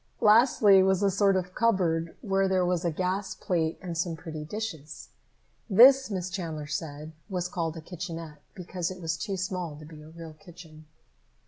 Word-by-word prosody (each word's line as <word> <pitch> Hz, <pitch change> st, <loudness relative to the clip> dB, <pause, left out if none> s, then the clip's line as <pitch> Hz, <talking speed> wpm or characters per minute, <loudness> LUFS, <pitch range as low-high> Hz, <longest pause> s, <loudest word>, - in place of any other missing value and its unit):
Lastly 210 Hz, -3 st, +6 dB
was 190 Hz, +1 st, +2 dB
a 200 Hz, -, +3 dB
sort 195 Hz, 0 st, +3 dB
of 185 Hz, -1 st, -2 dB
cupboard 175 Hz, -8 st, +1 dB
where 195 Hz, -3 st, +1 dB
there 185 Hz, -1 st, +1 dB
was 175 Hz, -1 st, 0 dB
a 170 Hz, -, +1 dB
gas 185 Hz, +4 st, -2 dB
plate 165 Hz, -3 st, -1 dB
and 175 Hz, -2 st, -5 dB
some 165 Hz, 0 st, -2 dB
pretty 160 Hz, -2 st, -7 dB
dishes. 160 Hz, -5 st, -7 dB, 0.6 s
This, 260 Hz, +5 st, +7 dB
Miss 185 Hz, -3 st, -4 dB
Chandler 165 Hz, -5 st, -4 dB
said, 150 Hz, +1 st, -5 dB, 0.2 s
was 180 Hz, -2 st, -2 dB
called 165 Hz, -2 st, -3 dB
a -, -, -7 dB
kitchenette, 165 Hz, -3 st, -8 dB
because 180 Hz, -2 st, -4 dB
it 185 Hz, 0 st, -8 dB
was 165 Hz, -2 st, -2 dB
too 195 Hz, +2 st, -4 dB
small 180 Hz, -4 st, -4 dB
to 150 Hz, +1 st, -12 dB
be 155 Hz, 0 st, -12 dB
a 155 Hz, -, -13 dB
real 165 Hz, -1 st, -10 dB
kitchen. 160 Hz, -2 st, -15 dB
180 Hz, 180 wpm, -27 LUFS, 160-190 Hz, 0.6 s, This